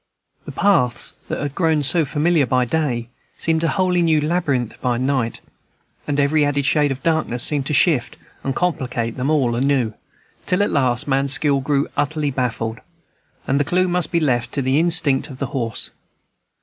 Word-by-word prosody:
The - - -7
paths 125 -12 +1
that - - -3
had 145 -1 -3
grown 160 -3 +1
so 160 +3 +2
familiar 150 0 +1
by 125 0 +2
day 125 -5 -2 0.3
seemed 160 0 0
a - - +2
wholly 180 0 +1
new 160 -2 +3
labyrinth 145 -7 -1
by 125 -2 0
night; 130 -2 -1 0.7
and 145 -1 -1
every 145 +2 +3
added 145 -1 0
shade 145 0 +2
of 135 - -5
darkness 155 -7 +1
seemed 145 -3 +1
to - - -1
shift 140 -4 +2 0.3
and 135 -1 -2
complicate 125 -9 -2
them 130 +2 -2
all 135 -6 +2
anew, 130 -3 +1 0.5
till 180 +3 +2
at 205 - -1
last 125 -2 +1
man's 135 0 +3
skill 145 -1 +1
grew 140 +1 0
utterly 150 0 -1
baffled, 115 -3 -2 0.7
and 135 +2 +1
the - - +3
clew 180 +5 +1
must 175 -2 +1
be 170 - +2
left 120 -6 0
to 140 - -1
the 130 +3 +2
instinct 160 -5 +2
of 130 - -9
the 135 - -2
horse. 115 -4 -3
140 Hz, 180 wpm, -20 LUFS, 130-160 Hz, 0.7 s, new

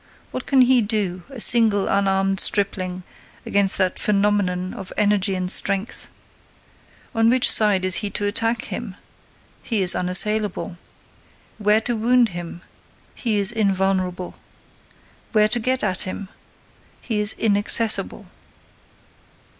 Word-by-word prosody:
What 255 - -6
can 270 -2 +3
he 250 0 +4
do, 205 -4 -2
a 270 -3 -10
single, 220 -4 +4
unarmed 195 -1 0
stripling, 185 -3 -1 0.4
against 200 -1 +1
that 185 -1 -1
phenomenon 200 -3 0
of 190 -1 -9
energy 205 -2 +1
and 185 0 -3
strength? 200 +2 -1 1.0
On 225 0 +2
which 250 +1 +4
side 205 -4 +3
is 185 -1 +2
he 205 - -2
to 205 - -4
attack 225 +3 -1
him? 215 -6 -6 0.7
He 220 -5 -1
is 180 - +5
unassailable. 195 0 -1 0.8
Where 210 +1 +2
to 240 +1 -3
wound 240 +1 +2
him? 175 -1 -9 0.5
He 225 -4 -2
is 200 +1 +5
invulnerable. 190 -4 -2 0.9
Where 215 -1 +4
to 240 - +1
get 255 +3 0
at 185 -4 -2
him? 190 +1 -6 0.7
He 220 -3 -4
is 210 0 +4
inaccessible. 215 +1 0
205 Hz, 125 wpm, -21 LUFS, 190-225 Hz, 1.0 s, is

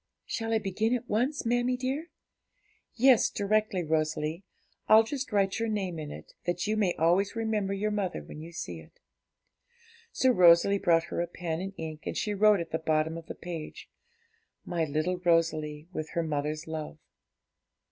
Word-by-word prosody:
'Shall 225 0 -3
I 225 - +3
begin 220 +3 0
at 245 0 -5
once, 250 +7 0
mammie 245 +2 +1
dear?' 265 +6 -3 0.9
'Yes, 255 -1 +5
directly, 205 -2 0
Rosalie; 155 +2 -1 0.4
I'll 220 +1 +8
just 270 +3 -4
write 195 -1 +1
your 230 0 -1
name 190 -6 -2
in 150 -1 -6
it, - - -10
that 175 +1 0
you 215 +1 0
may 200 -5 +1
always 180 +6 +2
remember 220 -3 -1
your 210 +2 -1
mother 195 - -2
when 150 - -10
you 165 +2 -9
see 90 - -6
it.' 80 - -17 1.1
So 260 - +3
Rosalie 180 0 +6
brought 165 -3 +3
her - - 0
a 175 - -1
pen 170 -1 -4
and 195 +1 -5
ink, 155 -1 -7
and - - -3
she 210 - -1
wrote 210 0 +5
at 170 - -5
the 160 - -1
bottom 160 0 0
of 165 -1 -8
the - - -6
page 165 -3 -8 0.7
'My 170 -2 -1
little 155 +5 -1
Rosalie, 165 -3 +1
with 155 -2 -4
her 170 - 0
mother's 150 0 -2
love.' 160 -1 -6
180 Hz, 175 wpm, -29 LUFS, 160-215 Hz, 1.1 s, I'll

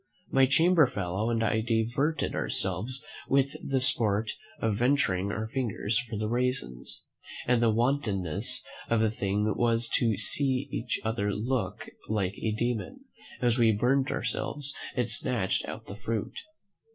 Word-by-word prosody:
My 135 0 +5
chamber 165 +2 +5
fellow 100 +1 -2
and 115 -1 +1
I 110 0 +2
diverted 120 +7 0
ourselves 110 +8 -2 0.3
with 140 0 +2
the 135 -1 +1
sport 110 -4 +2 0.3
of 110 -2 +1
venturing 110 -7 +2
our 110 +2 -3
fingers 115 -4 -1
for 120 -3 -5
the 105 +1 -1
raisins; 120 - -2 0.4
and 120 -1 +3
the 115 - +4
wantonness 115 - +1 0.3
of 115 - +3
the 110 -1 +3
thing 100 -1 0
was 115 -1 +2
to 115 -5 +2
see 130 +5 +1
each 120 +2 -2
other 110 -2 0
look 115 +5 -2 0.2
like 100 -3 0
a 110 - 0
demon, 120 - -2 0.4
as 120 0 +3
we 115 -2 +6
burnt 130 +6 +2
ourselves, 140 -1 -2 0.2
and 125 -4 +1
snatched 110 -2 0
out - - -7
the 100 - -8
fruit. 110 0 -3
115 Hz, 145 wpm, -29 LUFS, 105-130 Hz, 0.4 s, we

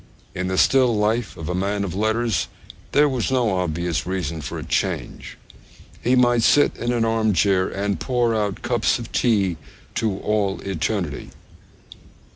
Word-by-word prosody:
In 90 +1 -3
the 95 0 -1
still 130 -1 +4
life 110 +2 0
of 80 - -6
a 90 - -2
man 100 +2 -1
of 95 - -4
letters 110 +2 0 0.4
there 150 +1 +5
was 130 -5 -1
no 120 -7 +1
obvious 85 -1 -2
reason 85 -4 -3
for - - -5
a - - -5
change. - - -3 0.6
He 125 +2 +2
might 120 -2 +4
sit 145 +5 +4
in 120 - -1
an 120 -2 +1
arm 110 -1 +1
chair 95 0 +2
and 100 -2 -2
pour 120 +6 +1
out 105 0 -2
cups 120 0 +1
of 120 -1 -8
tea 100 -8 +1 0.4
to 110 -4 -1
all 105 -2 0
eternity. 95 -4 -3
105 Hz, 160 wpm, -22 LUFS, 95-120 Hz, 0.6 s, there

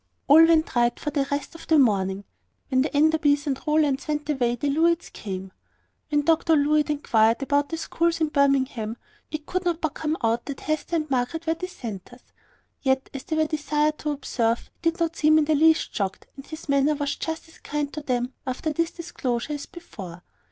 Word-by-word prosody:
All 310 +3 +8
went 325 -4 +2
right 240 0 +2
for 295 - -3
the 280 -2 0
rest 285 +3 -3
of 330 - -12
the 320 - +4
morning. 200 -6 +2 0.5
When 260 -1 +3
the 280 - 0
Enderbys 295 -1 +3
and 270 -3 -2
Rowlands 300 -2 +2
went 300 -1 -2
away, 245 -4 +1
the 280 +4 -1
Levitts 335 +3 +1
came. 190 -2 -6 0.6
When 295 -1 +2
Dr 325 +1 +3
Levitt 300 +1 +2
inquired 230 -4 +2
about 285 +1 +1
the 325 - -3
schools 335 +1 0
of 310 -2 0
Birmingham, 260 -5 +1 0.3
it 310 -1 -5
could 370 +3 -2
not 345 -2 0
but 315 -4 -2
come 315 0 -2
out 230 +1 +1
that 280 -2 -6
Hester 310 +2 -2
and 310 -2 -1
Margaret 265 +6 -1
were 325 - +2
dissenters. 245 - -8 0.6
Yet, 265 -1 0
as 270 -2 -7
they 315 - -2
were 315 0 +3
desired 300 0 0
to 305 - -3
observe, 240 -5 -1
he 330 - +3
did 330 - -8
not 335 -1 0
seem 310 0 +4
in 310 - +3
the 310 - +2
least 320 +2 +3
shocked, 195 -2 -3
and 275 - -11
his 315 0 -9
manner 280 +1 +3
was 285 -1 -2
just 320 0 -5
as 325 - -19
kind 290 -1 -3
to 305 - -5
them 250 -2 -2
after 260 +4 -2
this 335 +2 0
disclosure 300 -7 -3
as 290 - -6
before. 195 - -10
295 Hz, 200 wpm, -25 LUFS, 260-315 Hz, 0.6 s, All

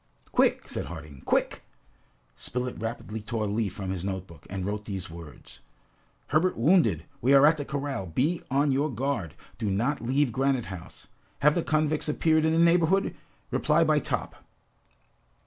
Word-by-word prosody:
"Quick!" - - +2
said - - -4
Harding. 75 -4 -9
"Quick!" - - +1 0.7
Spilett 125 - -4
rapidly 110 -1 -4
tore 110 +1 -3
a - - -1
leaf 105 -1 -1
from 95 -2 -4
his 90 -2 -4
note 95 -1 -3
book, 85 -5 -16
and 95 -1 -4
wrote 105 +1 -3
these 95 -4 -5
words: 80 -4 -12 0.7
"Herbert 165 +5 +2
wounded. 115 - +3 0.2
We 135 +4 +5
are 135 +1 +7
at 155 +1 +5
the 145 - -4
corral. 140 -9 -3
Be 145 - 0
on 140 +2 +2
your 140 +3 +1
guard. 120 - -2 0.2
Do 110 -4 -1
not 115 +9 0
leave 130 +3 +1
Granite 135 0 +1
House. 90 - -11 0.4
Have 150 +1 +5
the 175 - +1
convicts 155 -1 +1
appeared 160 +1 +2
in 160 - +2
the - - +2
neighborhood? 170 +3 +3 0.4
Reply - - +3
by - - +3
Top." - - -4
125 Hz, 165 wpm, -27 LUFS, 95-150 Hz, 0.7 s, are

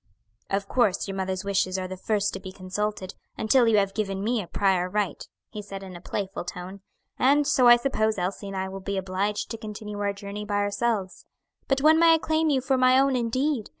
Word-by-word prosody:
"Of 195 0 -1
course 210 -6 +1
your 195 - -4
mother's 190 0 -2
wishes 190 -1 0
are 185 -1 -3
the 185 - -6
first 205 +2 -1
to - - -5
be 190 -1 -8
consulted, 190 +1 -4 0.2
until 235 +2 +3
you 220 -2 +4
have 195 -1 +1
given 195 -2 -2
me 230 +1 0
a 180 - -9
prior 185 -2 +1
right," 205 0 -2 0.3
he 210 - -6
said, 195 -1 -8
in 185 -2 -9
a 175 - -10
playful 195 0 -4
tone; 180 +2 -8 0.4
"and 285 +3 +4
so 265 -3 +4
I 240 - +10
suppose 220 -4 0
Elsie 190 +2 -3
and 195 -1 -5
I 190 0 -2
will 190 0 -7
be 200 +1 -3
obliged 190 +2 -2
to 225 - -5
continue 210 -1 -7
our 205 0 0
journey 200 +1 -7
by 205 -1 -3
ourselves. 205 -1 -1 0.4
But 270 0 +1
when 315 +2 +6
may 330 -1 +7
I - - +2
claim 315 0 0
you 270 -3 +2
for 265 0 +1
my 255 0 +5
own 275 -1 +3
indeed? 250 +1 -1
205 Hz, 220 wpm, -26 LUFS, 190-240 Hz, 0.4 s, I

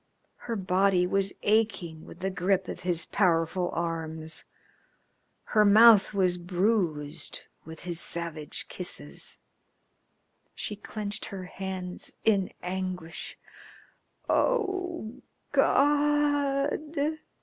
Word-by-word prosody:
Her 230 - 0
body 185 -1 +3
was 195 +1 +1
aching 205 -7 +1
with 175 - -12
the 190 +1 -1
grip 185 0 +1
of - - -5
his 175 -2 -1
powerful 175 -1 +1
arms, 160 -1 -3 1.0
her 215 - +3
mouth 215 0 +8
was 185 -3 +2
bruised 175 -5 0 0.2
with 160 0 -10
his 175 -2 -3
savage 165 -4 -2
kisses. 75 0 -5 1.2
She 210 - -4
clenched 210 0 -5
her 195 -2 -6
hands 185 -1 -5
in 200 -4 +3
anguish. 180 -2 -4 0.9
"Oh, 370 - 0 0.3
God!" 290 +1 +2
190 Hz, 95 wpm, -28 LUFS, 170-220 Hz, 1.2 s, mouth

